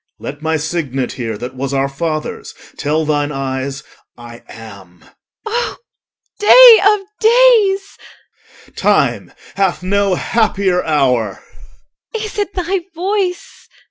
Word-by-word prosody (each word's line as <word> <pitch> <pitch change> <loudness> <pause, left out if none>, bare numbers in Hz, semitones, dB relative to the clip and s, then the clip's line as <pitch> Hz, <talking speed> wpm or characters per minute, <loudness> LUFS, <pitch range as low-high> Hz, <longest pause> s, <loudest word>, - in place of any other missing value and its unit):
OR. - - -21
Let 145 +2 -9
my 160 0 -1
signet 145 -5 -3
here, 115 -4 -5
That 125 +4 -7
was 135 +1 -4
our 135 0 +1
father's, 155 +2 -5 0.2
tell 155 +2 -1
thine 145 -1 -1
eyes, 135 +1 -4 0.3
I 120 0 -12
am. 100 -6 -13 0.4
EL. 435 - -5
O 475 0 -2 0.6
day 470 +2 +8
of 415 0 +3 0.2
days! 440 -4 +3 0.7
OR. - - -24
Time - - 0 0.3
hath 190 -2 0
no 200 0 +1
happier 195 -4 0
hour. 125 -9 0 0.7
EL. 445 - -2
Is 425 -1 -6
it 410 -1 -2
thy 370 +1 -1 0.2
voice? 370 0 -3
160 Hz, 130 wpm, -16 LUFS, -, 0.7 s, day